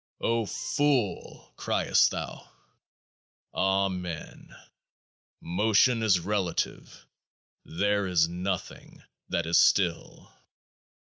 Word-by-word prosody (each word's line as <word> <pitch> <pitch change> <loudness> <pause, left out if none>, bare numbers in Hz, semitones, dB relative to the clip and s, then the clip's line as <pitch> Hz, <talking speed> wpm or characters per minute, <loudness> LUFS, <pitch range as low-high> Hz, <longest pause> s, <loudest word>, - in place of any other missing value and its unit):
Ofool! 115 +1 -1
criest - - +2
thou? - - -7 1.0
Amen. 95 -3 -2 0.9
Motion 110 +6 +2
is 100 -5 +3
relative: 95 -1 -3 0.6
there 100 +3 0
is 85 -3 +3
Nothing 90 +2 -5 0.3
that 85 - -1
is 85 +1 +3
still. 90 -4 +1
95 Hz, 70 wpm, -27 LUFS, 85-105 Hz, 1.0 s, is